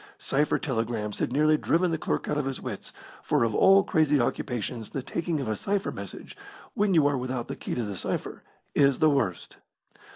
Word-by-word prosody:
Cipher 145 +2 +1
telegrams 115 -6 -2
had - - -1
nearly 155 +3 +4
driven 175 +3 +1
the 160 - 0
clerk - - -2
out - - 0
of 145 - -1
his 135 -1 -3
wits, - - -6 0.3
for - - +1
of 115 -2 +1
all 195 - +6
crazy 150 -4 +2
occupations 120 -1 -2
the 135 - -4
taking 165 +2 -2
of 135 - -3
a 110 - 0
cipher 195 - -1
message, 100 -2 -8 0.4
when 200 -2 +2
you 155 -3 +5
are 145 -2 +2
without 125 -1 -3
the - - -5
key - - -5
to 120 - -1
the 105 -2 -4
cipher, - - -4 0.3
is 140 -2 +4
the 155 -1 +4
worst. 95 -11 -1
135 Hz, 200 wpm, -27 LUFS, 115-155 Hz, 0.4 s, all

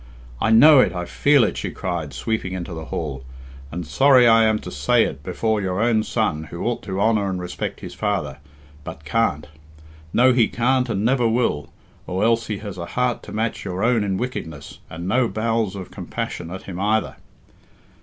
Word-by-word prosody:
I - - +2
know 135 +6 +8
it, - - +3
I 90 -1 -4
feel 145 +6 +3
it," - - -1
she - - -3
cried, 85 -5 -4
sweeping 95 - -3
into 90 -1 -5
the 80 -1 -6
hall, 70 -5 -5 0.5
"and 85 +1 -5
sorry 130 - +5
I 115 -1 +6
am 110 -1 +2
to - - -8
say 70 0 +2
it 70 - -4
before 105 +7 -1
your 95 -1 -2
own 115 -1 +3
son, 105 -9 -1
who 85 +2 -7
ought 120 0 -1
to 95 -1 -3
honour 105 -2 +2
and 95 -1 -3
respect 90 0 -5
his - - -8
father, 70 0 -2 0.4
but 75 0 -9
can't; 75 -6 0 0.7
no, 125 +5 +4
he 120 -3 +4
can't 125 +1 +1
and 105 -1 -1
never 125 -1 +3
will, 110 - 0 0.4
or 95 +3 -1
else 115 -1 +2
he 105 - -3
has 100 -3 -8
a 85 - -5
heart 125 -1 +1
to - - -11
match 110 +1 -2
your 90 +2 -3
own 115 -2 +3
in 95 -2 -1
wickedness, 85 - -6
and 85 +2 -6
no 125 +5 +2
bowels 110 -1 -1
of 95 -2 -8
compassion 85 - -5
at 95 +2 -7
him 90 -2 -7
either." 105 +2 0
105 Hz, 195 wpm, -22 LUFS, 90-115 Hz, 0.7 s, know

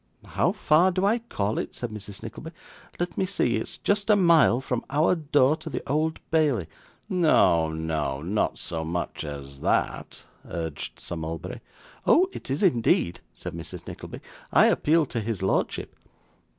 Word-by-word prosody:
'How - - +1
far 160 +5 +4
do 185 +1 0
I 225 +4 +3
call 110 - -2
it?' - - -5
said 120 -2 -5
Mrs. 105 -1 -8
Nickleby. 115 +8 -7 0.5
'Let 175 -1 -2
me 190 - +1
see. 125 - +1
It's 110 - -5
just 205 +1 0
a 210 - +7
mile 170 - +5
from 125 -2 -3
our 150 +6 +3
door 150 -3 +3
to 160 0 -8
the - - -5
Old 155 +3 0
Bailey.' 145 - +2 0.4
'No, 155 - +3
no. 80 -4 -2
Not 100 +5 0
so 80 -1 -4
much 85 +1 -3
as 70 -2 -8
that,' - - -1 0.2
urged 80 -4 -5
Sir 85 - -6
Mulberry. 80 0 -5 0.5
'Oh! 365 +3 +6
It - - -8
is 140 +8 -1
indeed,' 115 - +2 0.2
said - - -7
Mrs. - - -7
Nickleby. - - -8 0.3
'I - - +6
appeal 160 +1 +3
to 125 - -3
his 110 -3 -3
lordship. 95 - -1
125 Hz, 165 wpm, -26 LUFS, -, 0.5 s, a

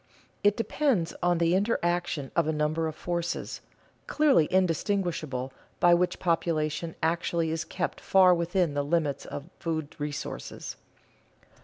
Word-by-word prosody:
It 205 0 +4
depends 230 - 0
on 175 0 +2
the 170 0 +2
interaction 175 - 0
of 170 -2 +2
a - - +2
number 155 +1 0
of 155 - -5
forces, 175 0 -3 0.5
clearly 285 - +4
distinguishable, 165 -7 0 0.3
by 175 0 +6
which 180 +1 +2
population 165 -1 -1
actually 165 0 0
is 160 +1 -1
kept 180 +1 -4
far 185 -1 +6
within 175 -1 +1
the 145 - 0
limits 145 -2 -1
of 145 +5 -7
food 160 -3 -3
resources. 145 0 -5
170 Hz, 130 wpm, -28 LUFS, 155-180 Hz, 0.5 s, by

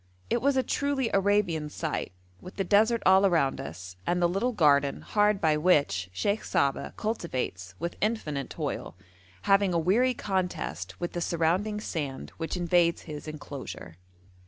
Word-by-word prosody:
It 235 - +2
was 275 +1 +2
a 260 - +3
truly 280 -4 0
Arabian 195 -6 +2
sight, - - -3 0.3
with 180 - -10
the 195 - 0
desert 220 +4 +3
all 190 +1 +6
around 165 -8 +2
us, 90 +3 -8
and 175 - +1
the 175 - +4
little 195 +8 0
garden 145 - +3
hard 210 -1 +2
by 155 -3 +2
which 140 - +2
Sheikh 200 - -1
Saba 140 -1 0
cultivates 130 - -3
with 170 +2 -4
infinite 155 - -1
toil, - - -4 0.5
having 195 -2 +3
a - - +4
weary 225 +10 +2
contest 95 - -3
with 175 - -3
the 175 - -3
surrounding 175 +6 0
sand 145 -9 -4
which 165 +2 -3
invades 175 -1 +2
his 150 -1 -8
enclosure. 140 - -8
175 Hz, 155 wpm, -28 LUFS, 145-205 Hz, 0.5 s, all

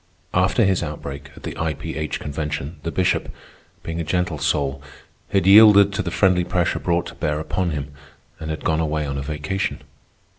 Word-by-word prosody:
After 90 +5 +3
his 95 -2 +2
outbreak 75 -3 -6
at - - -14
the - - -5
I. 80 -1 -1
P. - - -6
H. 75 0 -3
Convention, 75 +1 -4
the 85 - -3
Bishop, 90 +2 0 0.5
being 80 0 -4
a - - -1
gentle 90 -2 -1
soul, 70 0 0 0.5
had 100 -2 +1
yielded 100 0 +8
to - - -1
the 90 - -3
friendly 90 -1 +3
pressure 85 0 0
brought 85 0 0
to - - -8
bear 75 0 -2
upon 90 +3 -1
him, 70 -3 -4 0.5
and 80 -1 -6
had 80 - -5
gone 80 0 +2
away 75 -1 -1
on 70 -1 -3
a - - -3
vacation. 75 +7 -3
80 Hz, 190 wpm, -22 LUFS, 75-90 Hz, 0.5 s, yielded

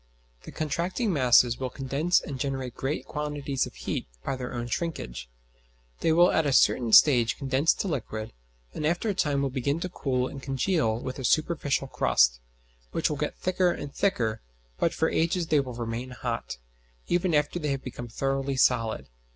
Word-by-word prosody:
The - - -8
contracting 175 - -1
masses 125 -4 +4
will 130 -1 -2
condense 140 +7 +1
and 140 -5 -6
generate 135 -2 -3
great 135 +3 -3
quantities 145 -2 -2
of - - -13
heat - - -4 0.2
by 135 - -1
their 125 -1 -5
own 120 -1 -4
shrinkage; 120 - -4 0.7
they 165 - +2
will 175 +2 +5
at 160 -2 +2
a - - +1
certain 120 -3 +3
stage 120 -3 +6
condense 135 +3 +2
to - - -3
liquid, 110 - -4 0.4
and - - -5
after 175 +7 0
a - - +1
time 145 -6 0
will 135 - -1
begin 140 +4 -1
to 185 - -3
cool 130 -7 -1
and 135 - -8
congeal 135 -3 0
with 130 +2 -6
a - - -5
superficial 150 0 +1
crust, - - +3 0.5
which - - 0
will - - -2
get - - -3
thicker 185 0 +1
and 145 -4 -4
thicker; 115 - 0 0.4
but - - +2
for - - 0
ages 170 +2 +1
they 155 -2 +3
will 130 -3 -3
remain 120 +2 -4
hot, 125 - -4 0.5
even 175 -1 +1
after 150 +4 +1
they 150 -3 -2
have 135 -1 -2
become 120 -1 -7
thoroughly 135 +3 -1
solid. 115 - +2
135 Hz, 180 wpm, -27 LUFS, 125-155 Hz, 0.7 s, stage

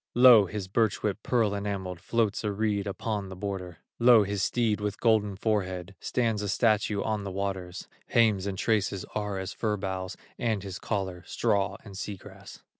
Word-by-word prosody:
Lo! 120 -5 +8
his 95 +1 -5
birch 110 +1 +1
whip, 105 -1 0
pearl 115 -4 +1
enameled, 100 -3 -3
Floats 110 +4 0
a 105 - 0
reed 105 -1 -1
upon 100 0 -3
the 95 - -7
border; 90 -3 -5 0.2
Lo! 120 -2 +7
his 100 -1 -2
steed 110 0 +1
with 105 0 -3
golden 110 -4 +2
forehead, 95 -3 -1
Stands 115 -4 0
a 105 - -2
statue 105 -1 +2
on 110 -2 -1
the 100 - -4
waters; 95 -2 -4 0.2
Hames 105 -5 +3
and 95 -1 -3
traces 100 -2 0
are 105 -2 -2
as 95 -1 -4
fir 105 -2 -1
boughs, 95 -1 -4 0.2
And 110 -4 0
his 95 -2 -6
collar, 95 -5 -3
straw 100 0 0
and 100 -2 -10
sea 100 +1 -4
grass. - - -13
100 Hz, 180 wpm, -28 LUFS, 95-110 Hz, 0.2 s, Lo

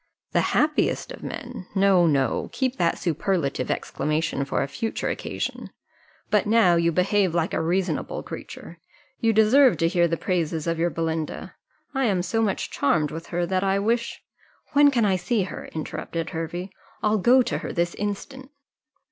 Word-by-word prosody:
"The - - +3 0.2
happiest 300 +9 +1
of - - -9
men! 245 -7 -7
No, 190 -3 +4
no; 135 -5 +1
keep 260 -1 -1
that 170 -1 +1
superlative 165 -3 -1
exclamation 155 -2 -1
for - - 0
a - - -3
future 225 - -3
occasion. - - -4 0.6
But 210 0 +3
now 215 -5 +5
you 170 0 +2
behave 185 +1 +2
like 170 -1 0
a - - 0
reasonable 180 +3 -1
creature, - - -9 0.4
you 230 -3 +3
deserve 225 +5 +5
to 165 - +2
hear 175 0 +3
the 165 0 -1
praises 165 -4 -1
of 165 -1 -1
your 170 +1 +2
Belinda 160 -1 -3 0.4
I 270 -1 +1
am 190 -5 +1
so 225 +4 0
much 210 -3 -1
charmed 150 +1 +1
with 165 +2 -7
her, 175 0 -1
that 185 +1 0
I 195 0 +2
wish 230 +4 -1 0.2
" - - -34
"When 290 0 +7
can 240 -5 +2
I 190 -2 +2
see 195 +4 0
her?" 185 - -7
interrupted 160 +1 -5
Hervey; 175 +3 -4 0.3
"I'll 210 0 +2
go 250 +6 +5
to - - -2
her - - -5
this 170 0 0
instant." 260 +6 -5
185 Hz, 175 wpm, -24 LUFS, 165-220 Hz, 0.6 s, When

